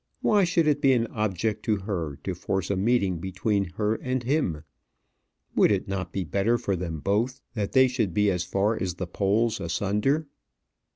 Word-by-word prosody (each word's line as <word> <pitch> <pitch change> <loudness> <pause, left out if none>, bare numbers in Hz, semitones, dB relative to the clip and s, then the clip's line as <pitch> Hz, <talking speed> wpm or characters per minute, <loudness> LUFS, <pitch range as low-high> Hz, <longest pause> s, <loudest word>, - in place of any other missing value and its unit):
Why 205 -3 +4
should 170 -2 +2
it 145 -1 +2
be 135 -2 +5
an 115 -2 +2
object 105 0 -1
to 110 - +2
her 90 -7 -3
to 95 - -2
force 95 +1 -2
a - - +1
meeting 100 -3 +1
between 95 +3 -1
her 105 0 +1
and 130 +2 -2
him? 120 - 0 0.9
Would - - +5
it 100 0 0
not 95 -2 -3
be 95 - -2
better 100 +8 +1
for 100 -5 -1
them 85 -4 -4
both 110 +6 0
that 105 -4 -3
they 130 0 +6
should 120 -7 -1
be 105 +1 +2
far 100 +5 0
as 90 -2 -2
the 95 - -4
poles 105 +5 +1
asunder? 105 - 0
100 Hz, 180 wpm, -26 LUFS, 95-120 Hz, 0.9 s, they